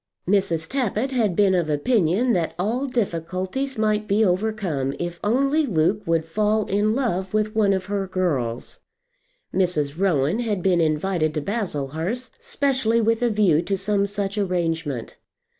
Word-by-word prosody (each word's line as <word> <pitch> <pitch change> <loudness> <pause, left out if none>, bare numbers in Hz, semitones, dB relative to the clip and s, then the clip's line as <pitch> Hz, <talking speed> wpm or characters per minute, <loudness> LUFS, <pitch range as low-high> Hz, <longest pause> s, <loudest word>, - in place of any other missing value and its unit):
Mrs. 175 -4 +1
Tappitt 260 -1 -1
had 220 -8 +1
been 200 -1 +4
of 175 -4 +1
opinion 195 - +2
that 170 -3 -1
all 230 +9 -1
difficulties 195 +3 -2
might 215 -1 +1
be 210 +2 +3
overcome 180 -8 -1
if 175 0 -4
only 275 +8 +2
Luke 190 +1 +1
would 165 -1 +1
fall 210 +5 +1
in 210 +3 +1
love 190 -7 -1
with 215 +1 0
one 210 -2 +3
of 190 -1 0
her 200 -1 -2
girls. 140 -11 -2 0.7
Mrs. 165 -5 0
Rowan 175 - +2
had 210 -6 -1
been 180 -3 +3
invited 155 0 0
to 150 - -1
Baslehurst 185 - -3
specially 275 - +1
with 230 +1 +1
a 240 - +3
view 200 -8 +3
to 195 +3 -2
some 200 +1 0
such 200 0 -3
arrangement. 165 - -2
195 Hz, 150 wpm, -23 LUFS, 165-220 Hz, 0.7 s, been